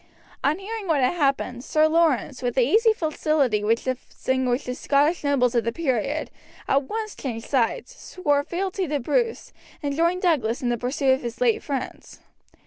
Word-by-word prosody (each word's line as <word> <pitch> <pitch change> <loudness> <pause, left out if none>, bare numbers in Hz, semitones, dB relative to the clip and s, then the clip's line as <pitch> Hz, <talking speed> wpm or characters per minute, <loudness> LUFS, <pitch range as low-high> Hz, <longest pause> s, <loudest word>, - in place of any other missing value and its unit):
Upon 295 +3 +2
hearing 415 +1 -6
what 310 -5 +2
had 250 - +2
happened, 275 -6 0
Sir 310 +2 +3
Laurence, 315 -5 +1
with 245 -1 -2
the 260 - +4
easy 440 - +4
facility 305 - 0
which 225 +2 +1
distinguished 260 0 -2
the 250 - -3
Scottish 290 +6 +1
nobles 270 -4 +2
of 235 -2 +2
the 230 - -1
period, 275 +1 -1 0.4
at 275 +1 +2
once 435 -1 -4
changed 230 -4 -5
sides, 280 - 0
swore 290 -11 -1
fealty 370 +3 -2
to 295 -1 -1
Bruce, 455 - -1 0.3
and 285 -1 -1
joined 340 +4 +1
Douglas 255 -10 +1
in 245 - +1
the 240 - 0
pursuit 260 +2 +1
of 265 - -1
his 235 -1 -6
late 240 -3 +2
friends. 275 -3 -6
280 Hz, 175 wpm, -24 LUFS, 250-335 Hz, 0.4 s, the